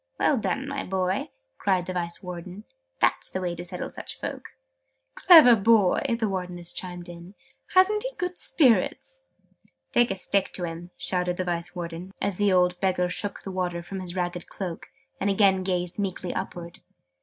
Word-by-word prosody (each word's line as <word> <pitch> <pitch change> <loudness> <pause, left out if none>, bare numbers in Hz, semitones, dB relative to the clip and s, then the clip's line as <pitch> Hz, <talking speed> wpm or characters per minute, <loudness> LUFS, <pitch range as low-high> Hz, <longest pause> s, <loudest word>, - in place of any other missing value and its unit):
"Well 290 - +3
done, 270 +5 -2
my 280 0 -3
boy!" 185 0 -1 0.3
cried 185 -3 +1
the 185 - -4
Vice 170 0 -4
Warden. 180 +2 -7 0.4
"That's - - +2
the 185 - -3
way 180 -2 -2
to 175 0 -6
settle 175 - -5
such - - -7
folk!" - - -6 0.6
"Clever 315 -10 +8
boy!", 215 -3 +4
the 225 -2 0
Wardeness 180 -3 -3
chimed 180 -1 -5
in. 175 +3 -11 0.4
"Hasn't 405 +3 +5
he - - -2
good 360 0 -3
spirits?" 300 - +2 0.7
"Take 240 0 +4
a 195 - -1
stick 195 +1 0
to 180 - -4
him!" 170 +1 -5
shouted 180 -1 0
the 185 - 0
Vice 175 0 -3
Warden, 175 +2 -6
as 200 -3 -2
the 205 -1 +3
old 180 -1 +3
Beggar 180 -1 +1
shook 200 +2 -3
the 195 - -5
water 180 -2 -2
from 190 +2 -6
his 180 -1 -6
ragged 175 -1 -3
cloak, 180 -4 -6 0.3
and 200 - +1
again 195 -1 +4
gazed 180 0 -2
meekly 185 -2 -3
upwards. 170 -1 -6
185 Hz, 175 wpm, -26 LUFS, 175-200 Hz, 0.7 s, Clever